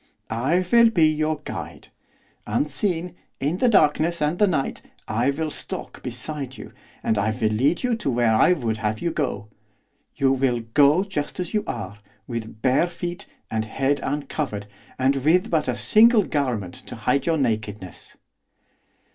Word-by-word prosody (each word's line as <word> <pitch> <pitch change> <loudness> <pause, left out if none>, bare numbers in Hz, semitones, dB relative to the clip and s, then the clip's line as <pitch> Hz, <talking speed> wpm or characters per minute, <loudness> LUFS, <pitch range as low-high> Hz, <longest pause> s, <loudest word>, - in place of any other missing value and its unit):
I 145 +11 +1
will 235 -1 +7
be 175 -8 +4
your 155 0 0
guide. 85 -8 -7 0.6
Unseen, 165 - -1 0.3
in 150 +6 -1
the 250 +4 +3
darkness 165 -3 +3
and 150 +3 0
the 210 - +5
night, 160 -7 -1 0.3
I 115 +5 +1
will 155 +2 -2
stalk - - -6
beside 130 +2 -5
you, - - -10 0.3
and 110 - +1
will 110 +2 +1
lead 140 - +1
you 245 -2 +1
to 210 - -2
where 120 -3 +2
I 145 +11 +5
would 115 -9 -2
have 110 0 -2
you 170 - -1
go. 130 -10 -2 0.7
You 135 -2 +2
will 130 -3 +1
go 150 +5 +5
just 185 -5 -4
as 180 -2 -4
you 210 - +1
are, 105 -3 -5 0.3
with 110 -2 -6
bare 130 +7 +3
feet, 175 +2 -6 0.2
and 110 0 0
head 135 +5 0
uncovered, 140 -6 -3 0.3
and 135 +1 +2
with 160 +7 +2
but 160 -4 +1
a 125 - 0
single 220 - +5
garment 125 - -2
to - - -7
hide 125 +6 0
your 165 -1 +2
nakedness. 110 - -3
140 Hz, 160 wpm, -23 LUFS, 115-170 Hz, 0.7 s, will